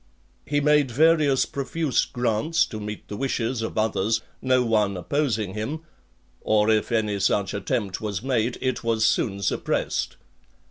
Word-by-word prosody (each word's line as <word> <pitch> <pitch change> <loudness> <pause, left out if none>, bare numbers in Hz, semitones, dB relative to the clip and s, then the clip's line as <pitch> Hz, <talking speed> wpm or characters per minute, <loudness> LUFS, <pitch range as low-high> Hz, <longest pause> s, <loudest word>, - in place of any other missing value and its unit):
He 145 0 +1
made 150 -2 +3
various 150 0 +3
profuse 140 +1 -1
grants 120 +6 0
to 110 - -7
meet 105 0 -7
the 105 - -6
wishes 120 0 -1
of 110 - -4
others, 110 0 +1 0.2
no 130 -1 +2
one 105 -4 +1
opposing 110 -3 -1
him; 125 +10 -4 0.6
or 110 0 +3
if 110 +1 +1
any 105 -3 0
such 95 0 +1
attempt 100 -1 -2
was 105 -1 -3
made, 125 -2 0
it 130 -2 -1
was 115 -1 +1
soon 100 -4 0
suppressed. - - -1
115 Hz, 145 wpm, -24 LUFS, 105-135 Hz, 0.6 s, made